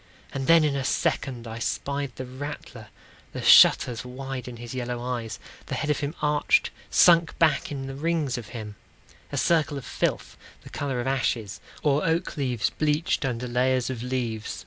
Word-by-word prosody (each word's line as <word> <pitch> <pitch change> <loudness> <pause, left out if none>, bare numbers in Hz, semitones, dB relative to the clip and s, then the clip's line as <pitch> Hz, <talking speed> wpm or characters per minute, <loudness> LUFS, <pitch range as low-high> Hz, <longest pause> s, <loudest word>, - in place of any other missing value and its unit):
And 135 -1 -3
then, 165 -1 +7
in 145 -2 +1
a 135 - -1
second, 125 -2 -1
I 115 +1 -6
spied 140 +2 -2
the 130 - -6
rattler— 130 -4 -8 0.5
The - - -5
shutters 120 -3 +6
wide 130 0 -6
in 120 -1 -7
his 120 +1 -8
yellow 125 -1 -3
eyes, 120 -3 -4 0.3
The - - -3
head 150 - -1
of 150 - 0
him 145 +2 -3
arched, 150 - +2 0.2
sunk 170 -2 +5
back 160 -2 +2
in 135 -2 -4
the 135 - -6
rings 150 -2 -1
of 120 -4 -6
him, 105 -3 -8 0.5
A - - -3
circle 155 -3 +2
of 135 - -7
filth, - - -2 0.3
the - - -12
color 135 -3 -2
of - - -5
ashes, 120 -6 -1 0.2
Or 145 0 +2
oak 165 +1 0
leaves 125 -7 -1
bleached 155 +5 0
under 125 -1 -2
layers 125 +1 +1
of 120 -3 -5
leaves. 120 -4 -3
130 Hz, 180 wpm, -26 LUFS, 120-150 Hz, 0.5 s, then